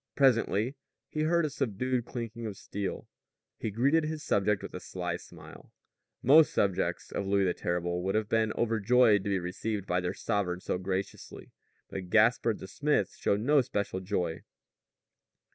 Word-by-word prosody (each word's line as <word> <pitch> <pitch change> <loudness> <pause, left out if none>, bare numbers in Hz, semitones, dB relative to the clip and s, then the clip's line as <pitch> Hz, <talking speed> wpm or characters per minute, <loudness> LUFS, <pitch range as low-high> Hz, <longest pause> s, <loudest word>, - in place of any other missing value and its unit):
Presently 120 -3 +3 0.4
he 155 - -2
heard 170 +1 +2
a - - -1
subdued 130 -2 -1
clinking 115 -2 -5
of 100 -3 -6
steel. 100 -1 -5 0.5
He 110 - -2
greeted 140 +10 +2
his 155 0 -4
subject 100 -4 +1
with - - -7
a - - -5
sly 90 -1 -4
smile. - - -14 0.5
Most 150 +5 +7
subjects 95 -3 0
of 100 - -3
Louis 100 0 +3
the 90 -2 +2
Terrible 90 0 -2
would 95 +2 -1
have 110 -1 +1
been 110 0 +1
overjoyed 115 -1 +3
to - - -1
be 100 - +2
received 95 +3 -3
by 90 -1 +1
their 90 -1 -3
sovereign 100 -5 -1
so 90 - -2
graciously. 95 +1 -5 0.4
But 95 -2 -6
Gaspard 110 +1 +3
the - - -9
smith 145 +9 0
showed 100 +1 0
no 145 +4 +4
special 100 -7 -2
joy. 90 -3 -2
105 Hz, 160 wpm, -30 LUFS, 95-125 Hz, 0.5 s, Most